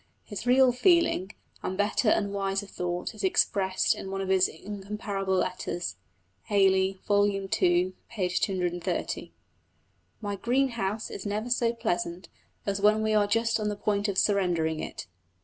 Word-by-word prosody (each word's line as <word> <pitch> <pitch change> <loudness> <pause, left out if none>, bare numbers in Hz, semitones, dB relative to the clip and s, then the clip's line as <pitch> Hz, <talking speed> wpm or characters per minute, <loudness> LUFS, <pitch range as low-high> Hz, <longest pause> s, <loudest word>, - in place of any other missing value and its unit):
His 210 +2 -7
real 255 0 +6
feeling, 250 - +3 0.3
and 185 - -3
better 210 +2 +2
and 200 -1 +1
wiser 195 0 -1
thought, 180 0 -4
is 215 -1 -8
expressed 190 0 +2
in 190 - -7
one 195 0 -3
of 190 -1 -3
his 190 -1 +4
incomparable 200 +1 -4
letters 175 - -2 0.5
(Hayley, 190 -1 +3
vol. 205 0 +4
ii. 195 -1 -3 0.7
p. 190 -5 -1
230) 175 -2 -2 0.9
"My 205 -2 -3
green 255 +6 +1
house 215 -2 -3
is 200 - -5
never 215 +4 -2
so 235 -1 +2
pleasant 175 -6 -3 0.4
as 200 0 -1
when 215 +1 +4
we 220 0 +1
are 210 -1 +3
just 230 +2 +1
on 210 -1 -1
the 210 - -2
point 205 0 0
of 200 -2 -2
surrendering 175 -7 +1
it.... - - -6
200 Hz, 150 wpm, -28 LUFS, 190-215 Hz, 0.9 s, real